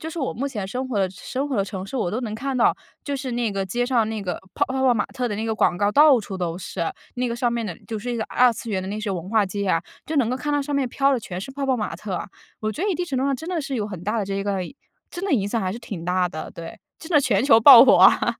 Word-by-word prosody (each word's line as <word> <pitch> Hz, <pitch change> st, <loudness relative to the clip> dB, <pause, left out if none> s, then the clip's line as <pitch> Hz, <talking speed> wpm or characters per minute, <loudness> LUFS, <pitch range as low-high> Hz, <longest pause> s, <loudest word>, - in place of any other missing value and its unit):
就 320 Hz, -, -5 dB
是 335 Hz, -, -7 dB
我 270 Hz, -, -1 dB
目 275 Hz, +3 st, -2 dB
前 210 Hz, -7 st, -4 dB
生 255 Hz, +6 st, -4 dB
活 225 Hz, -6 st, -1 dB
的 190 Hz, -2 st, +1 dB
生 260 Hz, +9 st, -4 dB
活 260 Hz, -, -2 dB
的 -, -, +3 dB
城 190 Hz, -1 st, -6 dB
市， -, -, -10 dB
我 180 Hz, -7 st, -1 dB
都 230 Hz, +5 st, -2 dB
能 215 Hz, -2 st, -4 dB
看 265 Hz, +3 st, -3 dB
到， -, -, +4 dB, 0.3 s
就 285 Hz, -, -3 dB
是 260 Hz, -2 st, -4 dB
那 235 Hz, -3 st, -1 dB
个 195 Hz, -1 st, -2 dB
街 240 Hz, +6 st, -1 dB
上 235 Hz, -4 st, +2 dB
那 220 Hz, -2 st, -4 dB
个 180 Hz, -3 st, -2 dB, 0.2 s
泡 -, -, +2 dB
泡 260 Hz, -, -5 dB
泡 255 Hz, -2 st, +4 dB
玛 215 Hz, -, 0 dB
特 250 Hz, -1 st, -3 dB
的 205 Hz, -, -3 dB
那 220 Hz, -, -3 dB
个 220 Hz, -, -1 dB
广 175 Hz, -, +2 dB
告， 205 Hz, 0 st, +1 dB
到 290 Hz, -3 st, +7 dB
处 195 Hz, -2 st, -7 dB
都 175 Hz, -2 st, -2 dB
是。 170 Hz, -2 st, -3 dB, 0.3 s
那 250 Hz, 0 st, 0 dB
个 235 Hz, -, -3 dB
上 240 Hz, -2 st, 0 dB
面 230 Hz, -2 st, -2 dB
的 175 Hz, -, -5 dB
就 220 Hz, -2 st, -3 dB
是 245 Hz, +4 st, -5 dB
一 -, -, -2 dB
个 220 Hz, -, -2 dB
二 250 Hz, 0 st, +4 dB
次 225 Hz, 0 st, -7 dB
元 190 Hz, -2 st, -1 dB
的 190 Hz, -, -6 dB
那 210 Hz, +2 st, -4 dB
些 210 Hz, -2 st, -3 dB
文 180 Hz, -1 st, -4 dB
化 220 Hz, -2 st, +3 dB
街 200 Hz, +1 st, -3 dB
啊， 165 Hz, -, +3 dB, 0.3 s
就 315 Hz, -, -3 dB
能 245 Hz, -4 st, +2 dB
够 255 Hz, -, -1 dB
看 295 Hz, +3 st, -3 dB
到 290 Hz, -1 st, +1 dB
上 290 Hz, 0 st, -4 dB
面 275 Hz, -3 st, +1 dB
飘 275 Hz, +3 st, +2 dB
的 250 Hz, -, 0 dB
全 180 Hz, -4 st, -6 dB
是 215 Hz, -, -7 dB
泡 275 Hz, 0 st, -3 dB
泡 260 Hz, -2 st, +2 dB
玛 210 Hz, -6 st, -3 dB
特。 190 Hz, 0 st, -4 dB, 0.4 s
我 215 Hz, 0 st, -2 dB
觉 315 Hz, -, -5 dB
得 415 Hz, -, +1 dB
一 -, -, 0 dB
定 355 Hz, +1 st, -2 dB
程 270 Hz, -7 st, -3 dB
度 265 Hz, -, 0 dB
上 275 Hz, -, +1 dB
真 320 Hz, -, -9 dB
的 350 Hz, -3 st, -1 dB
是 275 Hz, -1 st, -4 dB
有 210 Hz, -2 st, -2 dB
很 185 Hz, -5 st, -8 dB
大 220 Hz, +2 st, 0 dB
的 205 Hz, -, -1 dB
这 195 Hz, 0 st, -3 dB
个 200 Hz, -1 st, -1 dB, 0.5 s
真 350 Hz, -, -7 dB
的 395 Hz, -, 0 dB
影 205 Hz, -7 st, +2 dB
响 230 Hz, +1 st, -1 dB
还 185 Hz, -1 st, -1 dB
是 230 Hz, -, -6 dB
挺 190 Hz, -8 st, -7 dB
大 180 Hz, 0 st, +1 dB
的。 155 Hz, -, -7 dB
对， 165 Hz, 0 st, -9 dB, 0.2 s
真 325 Hz, -, -11 dB
的 295 Hz, -3 st, +5 dB
全 245 Hz, -5 st, +1 dB
球 225 Hz, -5 st, +6 dB
爆 255 Hz, 0 st, +11 dB
火 265 Hz, -, +6 dB
啊。 -, -, +5 dB
230 Hz, 350 characters per minute, -23 LUFS, 195-265 Hz, 0.5 s, 爆